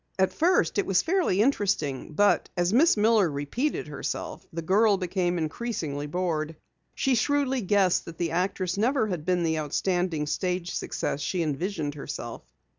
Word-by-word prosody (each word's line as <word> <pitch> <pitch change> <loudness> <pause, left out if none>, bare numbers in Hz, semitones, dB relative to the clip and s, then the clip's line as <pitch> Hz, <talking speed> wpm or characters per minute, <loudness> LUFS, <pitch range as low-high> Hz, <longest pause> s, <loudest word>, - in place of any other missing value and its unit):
As 190 -1 +2
first, 325 - +2
it - - 0
was 190 -2 +3
fairly 330 - +2
interesting, 195 - 0
but 205 +6 +3
as 175 +2 +1
Miss 285 +2 +5
Miller 210 -3 +4
repeated 145 - -2
herself, - - -5
the 165 0 -5
girl 200 +3 +4
became 180 -1 -1
increasingly 155 -4 -3
bored. 160 -1 -2 0.4
She 270 - +1
shrewdly 270 +1 +1
guessed 195 -2 +2
that 165 -1 -9
the 170 -2 -1
actress 185 +1 -1
never 250 +2 +2
had 170 -5 -4
been 180 -1 +1
the 160 -1 0
outstanding 165 +1 -1
stage 180 +3 -2
success 145 - -3
she 170 +3 -1
visioned 155 0 -2
herself. 140 -5 -6
180 Hz, 155 wpm, -27 LUFS, 160-210 Hz, 0.4 s, Miss